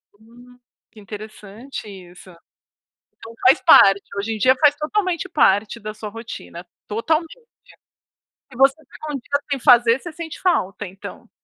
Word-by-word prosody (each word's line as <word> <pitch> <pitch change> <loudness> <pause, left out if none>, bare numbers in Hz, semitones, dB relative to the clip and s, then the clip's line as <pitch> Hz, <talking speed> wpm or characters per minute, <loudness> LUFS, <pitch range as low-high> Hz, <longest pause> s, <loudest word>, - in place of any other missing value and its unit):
Hum. 240 +3 -19 0.3
Que 220 - -16
interessante 215 +4 -10
isso. 185 -2 -13 0.9
Então 225 0 -12
faz 255 +1 +5
parte. 195 -5 +6
Hoje 215 +2 -3
em - - -6
dia 255 +4 +4
faz 295 -1 +5
totalmente 365 +2 -2
parte 220 - +2
da 215 +1 -7
sua 215 0 -8
rotina, 205 -5 -10 0.2
totalmente. 320 - -2 1.1
Se 245 - -14
você 270 +1 +4
ficar 310 +3 -11
1 - - -6
dia 285 +3 -3
sem 275 -2 -2
fazer 240 0 +5
você 345 - -9
sente 320 0 -8
falta, 205 - -1
então. 190 +2 -11
235 Hz, 145 wpm, -20 LUFS, 210-285 Hz, 1.1 s, parte